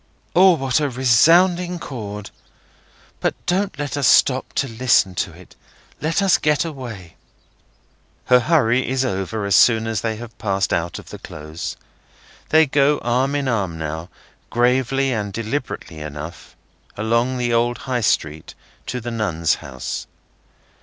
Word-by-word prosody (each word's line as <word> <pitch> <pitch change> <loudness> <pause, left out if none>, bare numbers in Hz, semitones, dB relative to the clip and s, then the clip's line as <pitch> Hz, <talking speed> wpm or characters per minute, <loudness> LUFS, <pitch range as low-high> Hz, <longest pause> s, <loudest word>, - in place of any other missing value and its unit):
O, 185 +1 +7
what 135 -2 0
a 145 -2 0
resounding 170 +8 +4
chord! 105 -9 -7 0.9
But - - 0
don't 185 -3 0
let 145 -2 -3
us 140 -4 +2
stop 130 -1 +4
to 135 - 0
listen 115 -5 +2
to 90 +1 -2
it; 85 +2 -16 0.5
let 165 +6 0
us 195 - +4
get 150 +1 +1
away!" 120 - -8 1.1
Her 125 0 +5
hurry 130 -3 +2
is 130 0 0
over 100 0 -2
as 100 - 0
soon 115 +2 +5
as 110 -3 -2
they 110 -1 -2
have 115 0 -10
passed 100 -3 0
out 85 0 -1
of - - -11
the - - -9
Close. 75 +2 -7 0.7
They 160 0 +6
go 145 +1 +3
arm 130 +4 +1
in 140 -2 -1
arm 100 -9 -1
now, 80 +2 -5 0.4
gravely 130 +2 +1
and 105 -3 -3
deliberately 115 - -4
enough, 75 +2 -8 0.4
along 115 +4 +1
the 120 -1 0
old 120 +1 +1
High 125 -2 -1
street, 80 -7 -1 0.3
to 125 - -3
the 120 +1 -5
Nuns' 85 -8 0
House. 65 -5 -6
120 Hz, 145 wpm, -21 LUFS, 100-135 Hz, 1.1 s, O